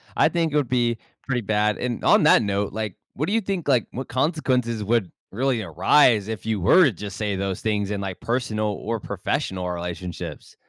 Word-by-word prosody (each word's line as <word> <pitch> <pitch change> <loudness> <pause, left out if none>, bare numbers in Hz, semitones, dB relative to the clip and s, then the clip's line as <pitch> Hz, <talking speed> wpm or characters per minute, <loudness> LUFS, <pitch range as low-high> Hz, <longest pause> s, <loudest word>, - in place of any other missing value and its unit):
I - - +4
think 165 -3 0
it - - -1
would 145 -5 +1
be 120 -2 +1 0.3
pretty 125 -3 -1
bad, 105 0 +1
and 120 -2 -3
on - - +5
that - - +6
note, 100 -1 -1
like, 110 -4 -4 0.2
what 150 +6 -2
do 200 - -1
you 225 - +2
think, 185 -5 -3
like, 125 -5 +3
what 130 +1 -5
consequences 130 -5 0
would 105 -4 0 0.2
really 125 +2 0
arise 105 - +3
if 110 -1 -5
you 110 -3 -1
were 175 - +6
to 135 - +3
just 100 0 -7
say 105 -2 -1
those 95 -1 -3
things 105 -2 -1
in 100 - -2
like 95 -2 -5
personal 115 -3 -1
or 110 +2 -3
professional 95 -2 -3
relationships? 90 0 -6
110 Hz, 200 wpm, -23 LUFS, 100-130 Hz, 0.3 s, that